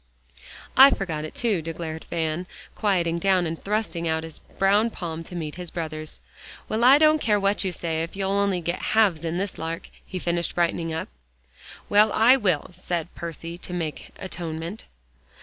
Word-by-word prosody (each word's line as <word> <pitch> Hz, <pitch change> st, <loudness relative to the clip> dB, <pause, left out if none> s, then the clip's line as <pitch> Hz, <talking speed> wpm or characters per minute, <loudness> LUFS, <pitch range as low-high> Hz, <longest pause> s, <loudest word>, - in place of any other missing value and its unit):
"I 270 Hz, +2 st, +10 dB
forgot 160 Hz, -, -2 dB
it, 155 Hz, -, -9 dB
too," 215 Hz, -8 st, +1 dB
declared 160 Hz, 0 st, -5 dB
Van, 165 Hz, +1 st, -2 dB, 0.3 s
quieting 175 Hz, -5 st, +1 dB
down, 190 Hz, -1 st, +3 dB
and 165 Hz, 0 st, -4 dB
thrusting 200 Hz, -5 st, -1 dB
out 160 Hz, 0 st, 0 dB
his 160 Hz, -1 st, -7 dB
brown 205 Hz, +4 st, +2 dB
palm 165 Hz, -6 st, -5 dB
to 180 Hz, -, -9 dB
meet 155 Hz, -3 st, -4 dB
his 175 Hz, -, -5 dB
brother's. 155 Hz, -2 st, -5 dB, 0.5 s
"Well, 220 Hz, +2 st, -1 dB
I 260 Hz, +3 st, +8 dB
don't 310 Hz, 0 st, +5 dB
care 210 Hz, -2 st, +2 dB
what 200 Hz, +1 st, +1 dB
you 190 Hz, -, -1 dB
say 160 Hz, -2 st, -2 dB
if 165 Hz, +3 st, -5 dB
you'll 195 Hz, 0 st, -1 dB
only 200 Hz, -2 st, +1 dB
go 170 Hz, +1 st, -1 dB
halves 190 Hz, -5 st, +2 dB
in 165 Hz, +1 st, -2 dB
this 195 Hz, +1 st, -3 dB
lark," 165 Hz, +1 st, -5 dB
he 185 Hz, -, -6 dB
finished, 170 Hz, -1 st, -1 dB
brightening 170 Hz, -1 st, 0 dB
up. 160 Hz, -, -3 dB, 0.8 s
"Well, 210 Hz, +1 st, +5 dB
I 235 Hz, +4 st, +6 dB
will," 185 Hz, -, 0 dB
said 175 Hz, -1 st, -4 dB
Percy, 170 Hz, 0 st, -7 dB
to 180 Hz, -, -6 dB
make 165 Hz, -4 st, -4 dB
atonement. 170 Hz, +1 st, -6 dB
175 Hz, 175 wpm, -25 LUFS, 165-200 Hz, 0.8 s, I